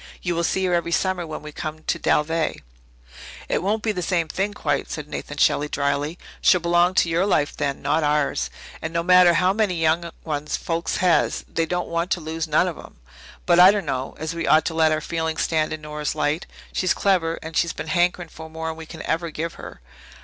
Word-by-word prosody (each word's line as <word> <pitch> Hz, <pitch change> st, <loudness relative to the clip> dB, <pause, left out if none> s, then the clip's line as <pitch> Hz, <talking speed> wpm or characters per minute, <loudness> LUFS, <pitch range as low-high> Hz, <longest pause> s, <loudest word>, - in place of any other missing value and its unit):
You 175 Hz, -, 0 dB
will 170 Hz, 0 st, -1 dB
see 190 Hz, +2 st, +1 dB
her 180 Hz, -, +1 dB
every 170 Hz, -1 st, 0 dB
summer 180 Hz, -1 st, 0 dB
when 155 Hz, -1 st, -6 dB
we 150 Hz, -, -8 dB
come 155 Hz, +1 st, -6 dB
to -, -, -1 dB
Dalveigh." 160 Hz, +1 st, +1 dB, 0.9 s
"It -, -, 0 dB
won't 210 Hz, +4 st, -1 dB
be 220 Hz, -, +1 dB
the 180 Hz, -3 st, -3 dB
same 170 Hz, -2 st, 0 dB
thing 195 Hz, +6 st, -1 dB
quite," 205 Hz, -, -2 dB
said -, -, -5 dB
Nathan -, -, -6 dB
Shelley 145 Hz, +1 st, +2 dB
drily. 145 Hz, +3 st, -1 dB, 0.2 s
"She'll 180 Hz, -, +5 dB
belong 175 Hz, +2 st, +2 dB
to 170 Hz, -, +4 dB
your 165 Hz, +2 st, +1 dB
life 145 Hz, -7 st, +1 dB
then 140 Hz, -2 st, -2 dB
not 155 Hz, +3 st, +2 dB
ours. 145 Hz, -, +1 dB, 0.3 s
And 160 Hz, +1 st, -4 dB
no 170 Hz, 0 st, 0 dB
matter 180 Hz, -1 st, +6 dB
how 185 Hz, +2 st, +3 dB
many 210 Hz, -3 st, +1 dB
young 165 Hz, +1 st, +1 dB
ones 150 Hz, -1 st, -2 dB
folks 170 Hz, 0 st, -2 dB
has, 175 Hz, -2 st, +2 dB
they 165 Hz, 0 st, -1 dB
don't 180 Hz, +1 st, -2 dB
want 170 Hz, +1 st, -1 dB
to -, -, -3 dB
lose 160 Hz, +1 st, -4 dB
none 155 Hz, +4 st, +3 dB
of 175 Hz, -, -5 dB
'em. -, -, -13 dB, 0.5 s
But 175 Hz, -1 st, +4 dB
I 180 Hz, +1 st, +10 dB
dunno 150 Hz, -11 st, -1 dB
as 160 Hz, +1 st, -4 dB
we 170 Hz, -, -3 dB
ought 155 Hz, 0 st, +5 dB
to 165 Hz, -, -1 dB
let 160 Hz, -1 st, +3 dB
our 155 Hz, 0 st, 0 dB
feelings 160 Hz, 0 st, -2 dB
stand 155 Hz, -2 st, 0 dB
in 155 Hz, -1 st, -5 dB
Nora's 150 Hz, 0 st, -4 dB
light. 155 Hz, +2 st, -1 dB, 0.3 s
She's 185 Hz, -, +1 dB
clever, 170 Hz, -4 st, +1 dB
and 160 Hz, 0 st, -7 dB
she's 170 Hz, -, +2 dB
been -, -, -6 dB
hankering 175 Hz, 0 st, +1 dB
for 160 Hz, 0 st, -10 dB
more'n 160 Hz, 0 st, -4 dB
we 160 Hz, -1 st, -10 dB
can 160 Hz, -1 st, -8 dB
ever 165 Hz, +1 st, -1 dB
give 160 Hz, +2 st, -4 dB
her. -, -, -11 dB
165 Hz, 220 wpm, -23 LUFS, 155-175 Hz, 0.9 s, I